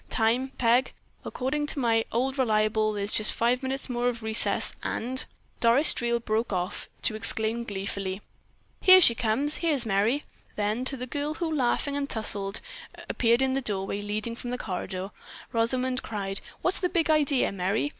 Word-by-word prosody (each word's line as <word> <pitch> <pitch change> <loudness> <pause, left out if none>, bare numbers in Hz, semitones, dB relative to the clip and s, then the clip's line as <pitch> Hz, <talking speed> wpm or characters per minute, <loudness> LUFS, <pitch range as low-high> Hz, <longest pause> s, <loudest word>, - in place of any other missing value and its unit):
"Time, 240 +4 +1
Peg? 245 +2 +2 0.3
According 295 +3 -2
to 290 - -4
my 225 -3 +2
old 265 +4 -1
reliable 215 -2 +2
there's 205 0 0
just 215 - +4
five 245 +2 +1
minutes 265 +1 -2
more 245 -1 0
of 235 -2 -6
recess 220 0 0
and——" 255 +3 -3 0.3
Doris 240 +6 +4
Dreel 235 0 0
broke 225 0 -1
off 180 0 -3
to 215 - +2
exclaim 220 +2 +2
gleefully: 195 -1 -4 0.6
"Here 370 0 +8
she 280 -10 +7
comes! 250 +6 +1
Here's 300 -8 +1
Merry!" 220 +7 +1 0.3
Then 215 +4 -1
to 270 +1 0
the 250 - -4
girl 290 +4 -3
who, 325 -1 -2
laughing 280 +1 0
and 285 0 -2
towsled, 200 -2 -1 0.5
appeared 235 +2 +2
in 265 0 +1
the 270 - 0
doorway 200 -3 -3
leading 210 +3 -4
from 245 - -7
the 250 - -2
corridor, 185 -1 -5 0.4
Rosamond 250 +3 +1
cried: 195 -3 -4 0.2
"What's 365 - +1
the 360 - 0
big 330 -3 +1
idea, 290 -4 +2
Merry? 195 +8 -1
235 Hz, 165 wpm, -27 LUFS, 215-265 Hz, 0.6 s, Here